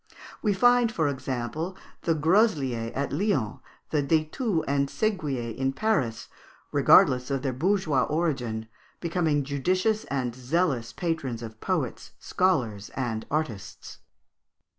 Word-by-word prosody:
We 210 Hz, -3 st, +2 dB
find, 245 Hz, +2 st, +4 dB
for 160 Hz, -8 st, +1 dB
example, 140 Hz, +6 st, -3 dB, 0.2 s
the 165 Hz, -, +1 dB
Grosliers 150 Hz, -, +2 dB
at 140 Hz, +1 st, -2 dB
Lyons, 150 Hz, -, 0 dB, 0.3 s
the 150 Hz, -, +2 dB
De 155 Hz, +2 st, +2 dB
Thous 200 Hz, -, 0 dB
and 140 Hz, 0 st, +1 dB
Seguiers 140 Hz, -, -2 dB
in 135 Hz, +1 st, 0 dB
Paris, 140 Hz, -, 0 dB, 0.4 s
regardless 125 Hz, 0 st, +5 dB
of 135 Hz, -1 st, -1 dB
their 135 Hz, -2 st, -1 dB
bourgeois 160 Hz, -2 st, +1 dB
origin, 130 Hz, -9 st, -1 dB, 0.3 s
becoming 165 Hz, -4 st, +1 dB
judicious 185 Hz, +10 st, 0 dB
and 125 Hz, -4 st, -2 dB
zealous 130 Hz, -1 st, 0 dB
patrons 150 Hz, -9 st, -3 dB
of 110 Hz, -1 st, -9 dB
poets, -, -, -2 dB
scholars, 120 Hz, -, 0 dB
and 115 Hz, -4 st, -3 dB
artists. 125 Hz, -10 st, -4 dB
145 Hz, 120 wpm, -27 LUFS, 125-180 Hz, 0.4 s, regardless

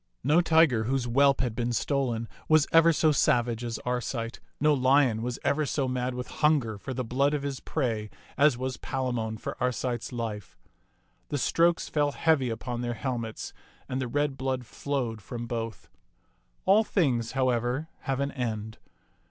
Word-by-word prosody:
No 150 Hz, +7 st, +4 dB
tiger 160 Hz, -9 st, +4 dB
whose 130 Hz, +1 st, 0 dB
whelp 140 Hz, +3 st, +4 dB
had 125 Hz, -4 st, -1 dB
been 120 Hz, 0 st, -1 dB
stolen 120 Hz, -2 st, -1 dB, 0.2 s
was 155 Hz, -1 st, +6 dB
ever 165 Hz, +1 st, +6 dB
so 155 Hz, 0 st, +3 dB
savage 120 Hz, -5 st, +2 dB
as 115 Hz, -2 st, -3 dB
Arcite; 120 Hz, -1 st, -2 dB, 0.2 s
no 150 Hz, +1 st, +4 dB
lion 130 Hz, -4 st, +3 dB
was 120 Hz, +1 st, -3 dB
ever 155 Hz, +2 st, +2 dB
so 140 Hz, -2 st, -1 dB
mad 125 Hz, 0 st, -2 dB
with 125 Hz, 0 st, -4 dB, 0.2 s
hunger 135 Hz, -9 st, +2 dB
for 130 Hz, -, -6 dB
the 130 Hz, 0 st, -2 dB
blood 140 Hz, +5 st, +1 dB
of 145 Hz, -, -3 dB
his 140 Hz, -2 st, -3 dB
prey 115 Hz, -8 st, -2 dB, 0.3 s
as 145 Hz, -3 st, +4 dB
was 130 Hz, 0 st, -3 dB
Palamon 120 Hz, -4 st, -2 dB
for -, -, -5 dB
Arcite's 125 Hz, -1 st, -1 dB
life. 110 Hz, -5 st, -5 dB, 0.7 s
The 145 Hz, -, -1 dB
strokes 170 Hz, +5 st, +2 dB
fell 145 Hz, -1 st, +1 dB
heavy 150 Hz, -6 st, +2 dB
upon 120 Hz, +1 st, -4 dB
their 120 Hz, -1 st, -2 dB
helmets, 115 Hz, -3 st, -4 dB, 0.3 s
and 130 Hz, +1 st, -2 dB
the 130 Hz, -, -2 dB
red 145 Hz, +2 st, -1 dB
blood 130 Hz, -1 st, -2 dB
flowed 120 Hz, -4 st, -3 dB
from 120 Hz, +4 st, -6 dB
both. 115 Hz, -4 st, -5 dB, 0.8 s
All 205 Hz, +3 st, +5 dB
things, 130 Hz, -, 0 dB
however, 130 Hz, +2 st, 0 dB
have 135 Hz, -1 st, -2 dB
an 140 Hz, 0 st, -1 dB
end. 110 Hz, -4 st, -4 dB
130 Hz, 165 wpm, -28 LUFS, 120-140 Hz, 0.8 s, was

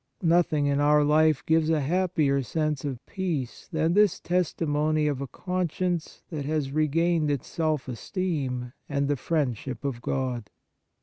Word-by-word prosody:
Nothing 165 Hz, -3 st, +3 dB
in 140 Hz, 0 st, +2 dB
our 150 Hz, +1 st, +5 dB
life 155 Hz, 0 st, +3 dB
gives 160 Hz, 0 st, +3 dB
a 160 Hz, -1 st, +3 dB
happier 155 Hz, -3 st, +1 dB
sense 155 Hz, +1 st, -1 dB
of 130 Hz, -3 st, -5 dB
peace 165 Hz, -10 st, -3 dB
than 160 Hz, 0 st, +1 dB
this 205 Hz, -2 st, +4 dB
testimony 155 Hz, -3 st, 0 dB
of 145 Hz, -3 st, -1 dB
a 140 Hz, -, -3 dB
conscience 180 Hz, +2 st, -2 dB
that 150 Hz, -3 st, -3 dB
has 145 Hz, -1 st, -1 dB
regained 155 Hz, +2 st, +2 dB
its 140 Hz, -3 st, -1 dB
self 155 Hz, -5 st, -1 dB
esteem 130 Hz, -, -3 dB, 0.2 s
and 140 Hz, -1 st, 0 dB
the 145 Hz, -, +1 dB
friendship 135 Hz, -3 st, -2 dB
of 125 Hz, -4 st, -3 dB
God. 125 Hz, -5 st, -2 dB
150 Hz, 145 wpm, -27 LUFS, 140-165 Hz, 0.2 s, our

